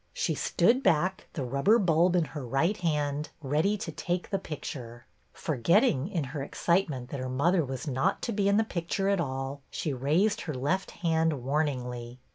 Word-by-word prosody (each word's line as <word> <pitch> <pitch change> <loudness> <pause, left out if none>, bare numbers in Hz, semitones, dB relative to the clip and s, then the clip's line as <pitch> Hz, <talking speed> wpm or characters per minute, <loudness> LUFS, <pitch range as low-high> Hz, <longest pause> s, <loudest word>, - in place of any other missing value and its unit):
She - - 0
stood 250 +3 +2
back, 185 - +1
the 140 - -3
rubber 140 - +3
bulb 175 -3 +3
in 170 -3 +3
her 145 -3 -5
right 135 - +1
hand, 150 -5 -1
ready 155 +8 +1
to - - -5
take 175 0 -3
the 195 - +1
picture. 125 -8 -7 0.3
Forgetting, 155 - +2
in 180 -6 -2
her 140 +2 -5
ex 135 - -7
citement, 160 -8 +1
that 140 - -4
her 130 0 -3
mother 165 +7 +2
was 130 -1 -5
not 135 -1 +1
to 235 - -1
be 200 -2 +1
in 200 - +4
the 220 - +4
picture 195 0 -2
at 200 -3 +2
all, 135 -1 -4
she 150 - -3
raised 165 - +1
her 155 -5 -4
left 150 +9 -1 0.2
hand 160 -5 +1
warningly. 125 -4 -2
155 Hz, 185 wpm, -29 LUFS, 135-185 Hz, 0.3 s, in